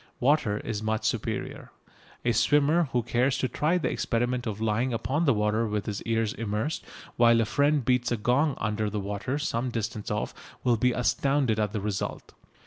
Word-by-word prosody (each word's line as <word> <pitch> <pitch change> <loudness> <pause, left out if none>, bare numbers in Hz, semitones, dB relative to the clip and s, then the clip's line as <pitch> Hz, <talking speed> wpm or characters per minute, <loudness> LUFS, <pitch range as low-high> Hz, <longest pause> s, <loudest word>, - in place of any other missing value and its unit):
Water 125 -6 +2
is 105 -1 -4
much 110 0 -1
superior. - - -3 0.6
A 120 - +3
swimmer 145 +6 +3
who 120 -1 +1
cares 125 +3 +1
to 130 - 0
try 155 +7 +1
the 175 - -1
experiment 120 +1 -1
of 105 -1 -4
lying 110 +3 0
upon 135 +8 0
the 140 - +4
water 105 +2 +1
with 105 -1 -2
his 105 -2 -4
ears 115 -1 +1
immersed 110 - -2 0.3
while 115 -1 +5
a 115 - +2
friend 140 +4 +2
beats 125 0 +2
a 120 - +1
gong 130 +7 +1
under 105 -1 -1
the 105 0 -3
water 100 +7 -3
some 130 -4 -1
distance 115 -2 -4
off 105 0 -2 0.3
will 120 -2 +3
be 125 +3 +2
astounded 125 -1 +1
at 105 -1 0
the 105 -1 -3
result. 100 -2 -4
115 Hz, 185 wpm, -27 LUFS, 110-130 Hz, 0.6 s, while